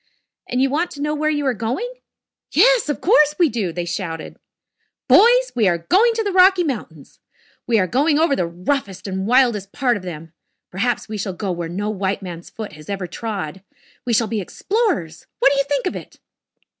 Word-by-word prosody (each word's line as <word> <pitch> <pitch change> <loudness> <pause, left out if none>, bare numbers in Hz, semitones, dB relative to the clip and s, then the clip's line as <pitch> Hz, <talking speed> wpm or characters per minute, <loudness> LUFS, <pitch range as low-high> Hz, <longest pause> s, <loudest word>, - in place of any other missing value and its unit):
And 250 - -1
you 270 - +1
want 330 +5 0
to 285 - -8
know 300 0 0
where 305 +1 0
you 295 -2 -1
are 260 - +2
going?" 240 - -3 0.6
"Yes, - - +4
of 295 - -2
course 300 -7 +4
we 345 -4 +4
do," 215 -7 -2
they 175 +1 -4
shouted. 170 -2 -5 0.7
"Boys, - - +5
we 225 -5 +3
are 175 -2 +2
going 405 - +3
to 450 - 0
the 405 - -1
Rocky 370 0 +5
Mountains! 210 - -6 0.5
We 235 -2 +3
are 190 - +3
going 290 - +2
over 315 -3 +3
the 175 - -1
roughest 185 +2 -3
and 190 0 -3
wildest 235 -6 +2
part 245 -4 +1
of - - -9
them. 165 -2 -8 0.4
Perhaps 225 +6 -1
we 215 -1 -5
shall 190 -1 -3
go 195 +1 -3
where 170 -1 -4
no 205 +5 -3
white 195 -1 -2
man's 175 -2 -8
foot 215 -6 -8 0.2
ever 195 -2 -3
has - - -13
trod. 195 -6 -5 0.4
We 245 - -2
shall 230 +1 +3
be 215 -1 -2
explorers. 350 - -2
What 275 - +4
do 280 - +1
you 275 - +1
think 280 -2 -1
of 365 - -2
it?" - - -10
230 Hz, 205 wpm, -20 LUFS, 185-300 Hz, 0.7 s, Boys